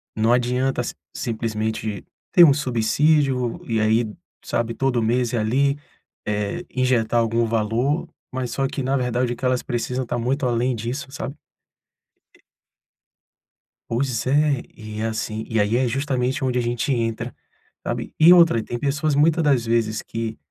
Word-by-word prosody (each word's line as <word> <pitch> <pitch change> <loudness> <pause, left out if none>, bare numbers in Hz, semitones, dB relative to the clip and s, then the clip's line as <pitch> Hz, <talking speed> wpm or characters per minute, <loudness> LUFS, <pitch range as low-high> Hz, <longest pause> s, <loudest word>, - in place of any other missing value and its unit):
não 110 +2 +3
adianta 125 +1 +1
si - - -5 0.2
simplesmente 110 -3 -3 0.3
ter 175 - +9
um 150 -4 +8
subsídio 130 0 +1
e 115 -1 0
aí, 110 +2 +3 0.4
sabe, 115 0 -1
todo 135 -3 +1
mês 120 +1 +1
ir - - +1
ali, 135 +6 +1 0.5
eh, 105 -1 -2
injetar 125 -3 +2
algum 115 0 +1
valor, 115 +7 0 0.3
mas 130 -2 -3
só 135 -1 0
que 135 - -4
na 135 +2 +1
verdade 125 -1 0
o - - -7
que 130 - -5
elas 125 -1 +2
precisam 125 +2 -2
tá 120 - -2
muito 130 +4 -1
além 120 +1 +1
disso, 125 +5 -5
sabe? 135 +1 -6 2.5
Pois 125 0 -1
é, 145 0 +2
e 110 -1 -7
assim, 110 0 -3
e 110 -1 +1
aí 105 +3 +2
é 130 +1 +2
justamente 130 +2 -1
onde 125 -1 +1
a - - +1
gente 120 +3 -1
entra, 115 0 -2 0.5
sabe. - - -3
E 165 +3 +8
outra, 170 -9 +6
tem 120 - -5
pessoas 150 +1 0
muita 155 +3 +3
das 140 -6 +2
vezes 115 -2 0
que 115 -1 -4
120 Hz, 155 wpm, -22 LUFS, 115-135 Hz, 2.5 s, ter